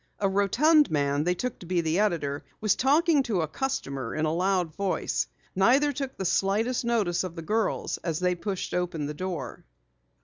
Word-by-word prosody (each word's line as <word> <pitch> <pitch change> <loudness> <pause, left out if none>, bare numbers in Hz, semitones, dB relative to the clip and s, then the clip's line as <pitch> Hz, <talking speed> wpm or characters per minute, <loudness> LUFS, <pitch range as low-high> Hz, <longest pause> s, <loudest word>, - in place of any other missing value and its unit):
A 200 - +2
rotund 265 - +4
man 145 0 0
they 180 0 +2
took 250 +6 -4
to 175 - -11
be 180 0 +1
the 165 +2 0
editor 155 -9 0 0.2
was 215 -2 +3
talking 300 +3 +3
to 215 -9 -1
a 160 - -1
customer 140 - -3
in 155 - 0
a 155 - 0
loud 180 -2 0
voice. 195 -2 -1 0.3
Neither 265 +10 +4
took 270 0 -5
the 190 - -3
slightest 210 +8 +1
notice 215 -8 +1
of 180 -2 -6
the 165 - -6
girls 215 +4 -1
as 165 -3 -1
they 180 0 +2
pushed 190 +2 -4
open 175 -4 -1
the 150 - -4
door. 165 -6 -5
185 Hz, 190 wpm, -27 LUFS, 165-230 Hz, 0.3 s, rotund